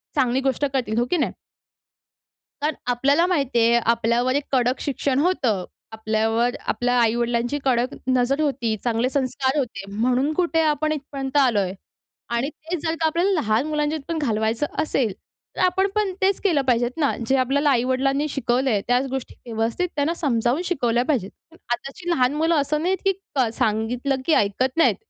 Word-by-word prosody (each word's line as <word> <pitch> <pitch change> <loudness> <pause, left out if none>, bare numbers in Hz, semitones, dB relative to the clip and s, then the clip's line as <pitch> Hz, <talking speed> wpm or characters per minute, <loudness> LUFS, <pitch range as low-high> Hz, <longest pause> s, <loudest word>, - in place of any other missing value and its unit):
चांगली 250 +1 +2
गोष्ट 270 +1 0
करतील, 240 -5 -1
हो 240 - +2
की 360 - +3
नाही? 300 - 0 1.3
कारण 300 +1 0 0.2
आपल्याला 280 +7 +3
माहिती 280 -9 +1
आहे 230 +1 +4 0.2
आपल्यावर 235 +3 +1
एक 285 - +1
कडक 255 -1 +1
शिक्षण 275 -1 -1
होतं. 255 - +1 0.3
आपल्यावर 220 +2 0
आपल्या 245 0 0
आई-वडिलांची 235 +3 0
कडक 250 0 +1
नजर 255 +3 +2
होती, 260 -7 0
चांगले 240 +1 +1
संस्कार 265 0 -1
होते. 240 -8 -2
म्हणून 250 +7 +1
कुठे 335 -1 +1
आपण 310 0 +1
इथपर्यंत 275 -2 -3
आलोय 210 -9 +2 0.6
आणि 235 +4 -1
तेच 315 +2 -6
जर 320 0 0
का, 325 - +1
आपल्याला 340 +5 +1
लहान 220 +3 +1
मुलांच्या 300 0 -1
पण 335 -1 -2
घालवायचं 225 -2 0 0.2
असेल 250 -9 0 0.4
तर - - -7
आपण 380 +2 +2
पण 420 -2 +1
तेच 385 0 +2
केलं 335 -8 +2
पाहिजेत 245 -2 +1
ना 290 -4 +2 0.2
जे 270 - +3
आपल्याला 280 +3 +2
आई-वडिलांनी 270 +3 +1
शिकवलंय 250 -4 0
त्याच 245 +2 +2
गोष्टी 265 -1 -5
व्यवस्थित 230 +9 -1
त्यांना 290 +3 +1
समजावून 260 -3 0
शिकवल्या 245 -9 +1
पाहिजेत. 235 -10 -1 0.2
पण 335 - -18 0.2
आताची 275 +8 -6
लहान 255 -5 +2
मुलं 325 +2 +2
असं 300 +1 0
नाहीत, 370 +3 +1
की 390 - +5 0.2
क 260 -3 +3
सांगितलं 230 +6 0
की 325 - +3
ऐकत 255 +5 +1
नाहीत, 330 - +4
265 Hz, 165 wpm, -23 LUFS, 235-300 Hz, 1.3 s, की